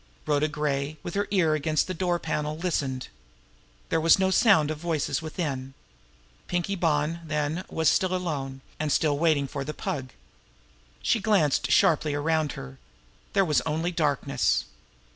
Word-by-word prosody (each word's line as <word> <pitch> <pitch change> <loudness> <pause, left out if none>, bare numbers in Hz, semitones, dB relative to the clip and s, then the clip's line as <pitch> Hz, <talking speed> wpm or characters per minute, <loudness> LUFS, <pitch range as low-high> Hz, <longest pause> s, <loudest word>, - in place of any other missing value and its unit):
Rhoda 150 0 +2
Gray, 150 -1 -2
with 175 - -5
her 200 +1 0
ear 180 -6 +3
against 155 +1 +1
the 185 - -4
door 175 0 0
panel, 150 -2 -3
listened. 140 -7 -2 0.8
There 160 - +1
was 165 0 +6
no 190 0 +2
sound 185 -7 +4
of 155 - -5
voices 160 -5 -1
from 160 - -9
within. 135 -5 -4 0.7
Pinkie 175 +2 -1
Bonn, 160 -2 0
then, 155 +2 -2
was 160 -1 0
still 185 +5 +3
alone, 140 -7 -3 0.2
and 155 -1 -1
still 145 -1 +2
waiting 155 -4 +2
for 140 0 -4
the 150 +2 -6
Pug. 130 -2 -4 0.9
She 230 - +2
glanced 160 -10 +2
sharply 150 +2 +3
around 155 0 0
her. 65 0 -9 0.5
There 195 -1 +4
was 150 -4 +2
only 160 +3 -1
darkness. 145 -4 +1
155 Hz, 155 wpm, -26 LUFS, 145-170 Hz, 0.9 s, was